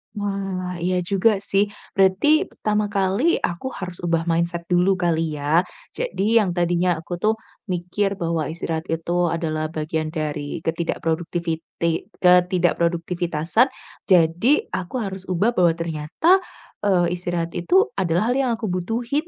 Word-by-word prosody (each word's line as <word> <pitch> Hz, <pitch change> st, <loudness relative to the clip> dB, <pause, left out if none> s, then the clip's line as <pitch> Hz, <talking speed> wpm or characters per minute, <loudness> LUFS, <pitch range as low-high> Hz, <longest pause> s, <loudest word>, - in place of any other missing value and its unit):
Wah, 195 Hz, -3 st, -3 dB
iya 180 Hz, 0 st, +1 dB
juga 195 Hz, +5 st, +3 dB
sih. 195 Hz, 0 st, +2 dB, 0.3 s
Berarti, 255 Hz, -, +4 dB
pertama 210 Hz, 0 st, -1 dB
kali 200 Hz, -, +1 dB
aku 175 Hz, +9 st, -2 dB
harus 180 Hz, -2 st, -6 dB
ubah 165 Hz, -1 st, +1 dB
mindset 170 Hz, +1 st, 0 dB
dulu 180 Hz, +2 st, +4 dB
kali 165 Hz, -3 st, 0 dB
ya. 150 Hz, +4 st, +2 dB, 0.3 s
Jadi 230 Hz, -, +1 dB
yang 205 Hz, -4 st, +1 dB
tadinya 175 Hz, 0 st, +2 dB
aku 170 Hz, +2 st, -6 dB
tuh 215 Hz, +4 st, +2 dB, 0.3 s
mikir 185 Hz, +2 st, -1 dB
bahwa 165 Hz, -3 st, -1 dB
istirahat 160 Hz, +1 st, -4 dB
itu 165 Hz, +1 st, -3 dB, 0.2 s
adalah 160 Hz, -2 st, -1 dB
bagian 155 Hz, 0 st, -3 dB
dari 155 Hz, -1 st, -4 dB
ketidakproduktiviti 165 Hz, 0 st, -2 dB, 0.2 s
ketidakproduktivitasan, 175 Hz, -, +2 dB, 0.4 s
jadi 180 Hz, -, +3 dB
aku 185 Hz, +4 st, -4 dB
harus 190 Hz, -2 st, -6 dB
ubah 185 Hz, +6 st, +2 dB
bahwa 175 Hz, -7 st, +3 dB
ternyata, 165 Hz, -, +2 dB, 0.4 s
eee, 180 Hz, -4 st, +2 dB
istirahat 175 Hz, -1 st, -2 dB
itu 380 Hz, -, +3 dB
adalah 180 Hz, +6 st, +1 dB
hal 250 Hz, -, +1 dB
yang 260 Hz, -3 st, +1 dB
aku 220 Hz, -4 st, -4 dB
butuhin, 235 Hz, -, -2 dB
175 Hz, 130 wpm, -22 LUFS, 165-195 Hz, 0.4 s, Berarti